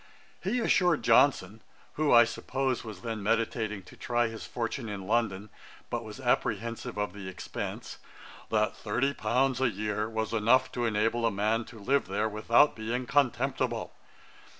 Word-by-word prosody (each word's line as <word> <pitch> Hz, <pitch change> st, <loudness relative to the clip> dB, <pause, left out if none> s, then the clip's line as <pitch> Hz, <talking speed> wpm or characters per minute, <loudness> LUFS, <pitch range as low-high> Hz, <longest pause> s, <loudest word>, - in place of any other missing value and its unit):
He 220 Hz, +7 st, 0 dB
assured 180 Hz, -8 st, +3 dB
Johnson, 110 Hz, -6 st, +3 dB, 0.3 s
who, 155 Hz, -1 st, +1 dB
I 120 Hz, 0 st, +9 dB
suppose, 130 Hz, +2 st, -2 dB
was 105 Hz, -5 st, -9 dB
then 115 Hz, -2 st, -4 dB
meditating 110 Hz, -1 st, -1 dB
to -, -, -15 dB
try 120 Hz, -1 st, 0 dB
his 115 Hz, 0 st, -8 dB
fortune 115 Hz, 0 st, -3 dB
in 100 Hz, -2 st, -5 dB
London, 110 Hz, -2 st, 0 dB, 0.4 s
but -, -, -2 dB
was -, -, -9 dB
apprehensive 115 Hz, 0 st, -1 dB
of 105 Hz, -3 st, -2 dB
the 100 Hz, -2 st, -8 dB
expence, 95 Hz, -1 st, -6 dB, 0.5 s
'that 110 Hz, -1 st, +1 dB
thirty 125 Hz, +7 st, -1 dB
pounds 130 Hz, +2 st, +1 dB
a 130 Hz, -, +3 dB
year 105 Hz, +1 st, -2 dB
was 110 Hz, 0 st, -3 dB
enough 115 Hz, +4 st, +3 dB
to 120 Hz, -1 st, -2 dB
enable 115 Hz, +2 st, +1 dB
a 115 Hz, -, +4 dB
man 110 Hz, +3 st, 0 dB
to 115 Hz, -, -13 dB
live 135 Hz, +7 st, +1 dB
there 105 Hz, +3 st, 0 dB
without 110 Hz, +6 st, +3 dB
being 115 Hz, +3 st, -3 dB
contemptible. 130 Hz, -2 st, 0 dB
115 Hz, 155 wpm, -29 LUFS, 105-125 Hz, 0.5 s, I